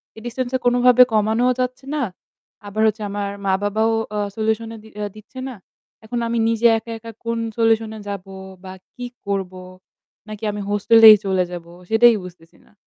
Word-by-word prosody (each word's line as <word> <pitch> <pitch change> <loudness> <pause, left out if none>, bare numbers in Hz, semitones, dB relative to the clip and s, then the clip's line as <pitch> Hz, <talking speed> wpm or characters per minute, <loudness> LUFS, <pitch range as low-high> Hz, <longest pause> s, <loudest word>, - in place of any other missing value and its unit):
এই 220 - -11
ডিসট্যান্সটা 255 +1 -2
কোনভাবে 245 0 +5
কমানোও 220 +4 +2
যাচ্ছে 255 +1 -3
না। 290 - 0 0.6
আবার 210 +2 -3
হচ্ছে 215 +1 -1
আমার 200 0 -3 0.2
মা-বাবাও 205 +3 +1 0.2
অ্যাঁ 205 -1 -2
সলিউশন 220 +1 -1
এ - - -10
দি 220 - -14 0.3
দিচ্ছে 215 +5 -12
না। 255 - -8 0.5
এখন 240 +2 -3
আমি 235 0 -1
নিজে 230 +1 +3
একা, 225 +1 -8
একা 230 +1 -10
কোন 230 0 -1 0.2
সলিউশন 225 -1 +2
এ - - -9
যাব 200 -2 -5 0.4
বা 185 - -8 0.2
কি 245 - -6 0.2
করব? 195 -2 -2 0.8
নাকি 215 +1 -9
আমি 205 0 -5
হোস্টেলেই 220 +1 +8
চলে 190 -1 +1
যাবো, 170 -1 -8 0.2
সেটাই 230 +1 +6
বুঝতেছি 170 -2 -14
না। - - -26
220 Hz, 170 wpm, -21 LUFS, 205-235 Hz, 0.8 s, হোস্টেলেই